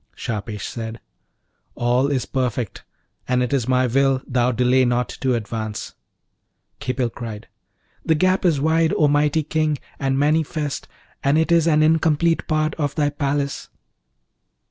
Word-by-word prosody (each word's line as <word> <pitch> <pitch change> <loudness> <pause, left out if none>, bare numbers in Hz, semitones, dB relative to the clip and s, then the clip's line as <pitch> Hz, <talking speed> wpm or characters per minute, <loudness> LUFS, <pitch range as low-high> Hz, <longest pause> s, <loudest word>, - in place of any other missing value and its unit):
Shahpesh 105 -1 -4
said, 115 -1 -6 0.8
'All 125 +3 +2
is 140 -3 -1
perfect, 125 -4 -2 0.4
and 125 0 +2
it 125 - -2
is 130 -4 0
my 130 0 +3
will 135 +2 +2
thou 125 0 +1
delay 125 +1 +3
not 120 0 +1
to 130 -2 +2
advance.' 110 -1 -4 0.9
Khipil 125 -2 -1
cried, 110 -3 -7 0.6
'The 160 - +2
gap 185 +4 +2
is 165 -6 +3
wide, 160 +2 +2
O 150 - +4
mighty 145 +2 +2
King, 155 0 0 0.2
and 135 -1 0
manifest, 150 0 0 0.4
and 140 +2 +3
it 160 +2 +1
is 170 -1 +4
an 155 -1 +4
incomplete 160 +1 +2
part 155 -1 +1
of 145 -2 -1
thy 145 -2 +1
palace.' 140 -1 -2
140 Hz, 145 wpm, -22 LUFS, 125-155 Hz, 0.9 s, O